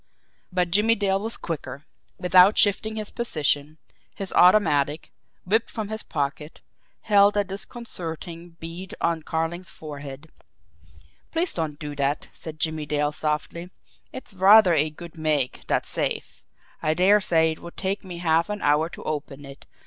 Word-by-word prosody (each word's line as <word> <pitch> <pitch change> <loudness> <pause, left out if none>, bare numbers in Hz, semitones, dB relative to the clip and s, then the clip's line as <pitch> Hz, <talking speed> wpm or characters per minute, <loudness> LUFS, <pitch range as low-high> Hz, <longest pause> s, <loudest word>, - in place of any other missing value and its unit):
But 180 -1 0
Jimmie 215 +5 +4
Dale 195 -2 +1
was 225 +3 -3
quicker 145 -3 -6 0.3
without 180 +3 +5
shifting 215 +2 +4
his 215 -1 -5
position, 155 - -1 0.4
his 195 -1 -6
automatic, 155 -6 +4 0.3
whipped 220 +5 +1
from 215 -3 -5
his 220 +1 -4
pocket, 150 +1 -4 0.4
held 205 -1 +4
a 205 - +3
disconcerting 175 -5 -7
bead 170 +3 -8
on 170 -1 0
Carling's 165 +3 -2
forehead. 145 0 -9 1.0
"Please 330 +1 0
don't 155 -3 -3
do 150 -1 -6
that," 140 +1 -1
said 155 -1 -9
Jimmie 155 -2 -1
Dale 150 0 0
softly. 155 +3 -3 0.4
"It's 260 -4 -7
rather 195 0 +7
a 155 -1 +2
good 170 +1 -12
make, 150 -5 -1
that - - +1
safe. - - -3 0.4
I 155 0 +1
dare 200 +4 +5
say 160 -3 +3
it 160 - -7
would 170 - -11
take 195 +1 -2
me 180 -3 -8
half 165 0 +1
an 210 0 -4
hour 150 +3 +3
to - - -10
open 145 -2 -5
it. 140 -1 -13
170 Hz, 150 wpm, -24 LUFS, 150-195 Hz, 1.0 s, rather